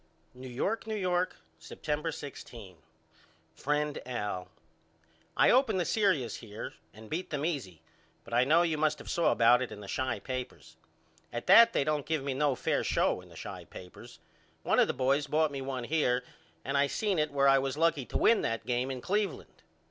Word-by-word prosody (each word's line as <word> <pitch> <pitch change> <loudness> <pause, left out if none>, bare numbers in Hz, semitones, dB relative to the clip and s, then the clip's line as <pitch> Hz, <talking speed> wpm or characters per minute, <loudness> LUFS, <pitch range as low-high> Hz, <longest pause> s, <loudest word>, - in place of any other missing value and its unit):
New 130 +1 -10
York, 200 - -2
New 220 - -2
York, 180 -2 0 0.2
September 150 - -3
16. 120 - -9 0.8
FRIEND 150 +1 -1
AL: 105 -7 -3 0.9
I - - +6
opened 250 -6 +3
the 175 - 0
serious 185 - +1
here 105 -3 -8 0.2
and 110 +1 -13
beat 170 +10 -4
them 150 0 -2
easy 125 - -4 0.4
but 115 - -11
I 120 +1 +4
know 160 +6 +4
you 160 -3 -1
must 155 0 +1
of - - -7
saw 170 - +2
about 120 +1 +5
it 130 - -3
in - - -8
the 100 - -10
Chi 130 +1 -2
papers. 130 +3 -7 0.6
At 120 - -5
that 230 0 +8
they - - +2
don't 150 -1 -1
give 155 -3 -1
me 140 -1 -2
no 140 0 +1
fair - - 0
show - - +1
in - - -17
the - - -14
Chi - - -8
papers. 90 -1 -12 0.5
One - - +2
of - - +5
the - - -1
boys 140 +3 +1
bought 155 +1 +2
one 135 -2 -4
here 125 -3 +1 0.4
and 140 +1 0
I 140 - +3
seen 200 +2 -1
in 150 0 +1
it - - -20
where 140 -1 +3
I 135 0 +6
was 135 +1 -3
lucky 155 -5 +1
to - - -2
win 230 - +4
that 115 0 -2
game 125 +1 -1
in 130 -2 -5
Cleveland. 205 +1 -2
140 Hz, 195 wpm, -30 LUFS, 125-160 Hz, 0.9 s, that